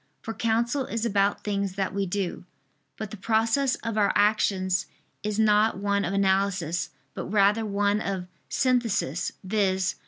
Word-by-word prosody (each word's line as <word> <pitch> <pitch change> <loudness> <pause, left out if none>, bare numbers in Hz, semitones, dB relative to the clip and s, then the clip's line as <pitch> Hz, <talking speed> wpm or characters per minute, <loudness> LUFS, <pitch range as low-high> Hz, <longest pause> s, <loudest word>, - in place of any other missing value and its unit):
For 225 - -4
counsel 235 +4 0
is 230 0 -2
about 200 -2 +1
things 200 -2 -1
that 195 -1 -2
we 200 0 -1
do. 185 -1 -3 0.5
But 215 -3 -6
the 215 - -7
process 225 +6 +2
of 225 -2 -1
our 205 - +4
actions 195 -3 +2 0.3
is 210 0 -2
not 215 -1 +3
one 200 0 0
of 175 - -2
analysis, 190 -3 +1 0.2
but - - -5
rather 210 +2 +3
one 205 +1 +1
of 190 -2 -3 0.2
synthesis, 230 - 0
viz. 190 -2 +1
205 Hz, 150 wpm, -26 LUFS, 195-220 Hz, 0.5 s, our